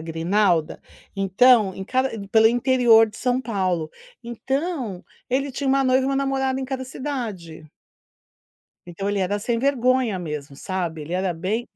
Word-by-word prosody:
grinalda, 165 +1 0 0.4
então, 195 +1 +4
em 190 - -6
cada 260 +5 0 0.2
pelo 220 0 +5
interior 240 -2 +4
de 215 - -13
São 250 +2 0
Paulo. 185 -9 -2 0.3
Então, 255 - -3 0.3
ele 275 +2 0
tinha 275 +2 -4
uma 275 +1 +3
noiva 260 0 +3
e - - -1
uma 275 0 0
namorada 270 -1 -1
em - - -3
cada 260 0 -4
cidade. 230 - -6 1.2
Então, 195 +3 -4
ele 205 - -1
era 195 +2 0
sem 230 +2 -1
vergonha 255 -4 +1
mesmo, 150 -5 -6
sabe? 170 0 -4
Ele 155 +3 -8
era 185 -1 -1
bem 200 +8 -3
225 Hz, 155 wpm, -23 LUFS, 185-260 Hz, 1.2 s, pelo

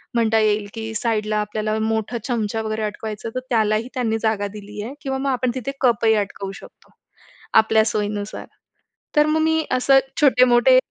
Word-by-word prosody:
म्हणता 225 -1 +3
येईल, 210 -1 +1
की 225 -1 -5
साईडला 215 -1 -1
आपल्याला 215 +1 -2
मोठा 220 +1 -1
चमचा 225 -3 -1
वगैरे 220 0 -3
अटकवायचं 215 +1 -5
तर - - 0
त्यालाही 220 -1 +1
त्यांनी 230 -4 0
जागा 220 -2 0
दिली 210 0 -8
आहे 240 +5 -6
किंवा 270 -1 -2
मग 275 +1 -2
आपण 255 -1 0
तिथे 260 +1 -3
कपही 230 -3 +3
अटकवू 200 -1 -3
शकतो, - - -14 0.6
आपल्या 220 0 +5
सोयीनुसार. 205 -1 -3 0.7
तर 300 0 +5
मग 315 +1 +2
मी 320 0 +1
असं 270 +2 +4 0.2
छोटे-मोठे 255 -2 +5
220 Hz, 160 wpm, -21 LUFS, 215-250 Hz, 0.7 s, आपल्या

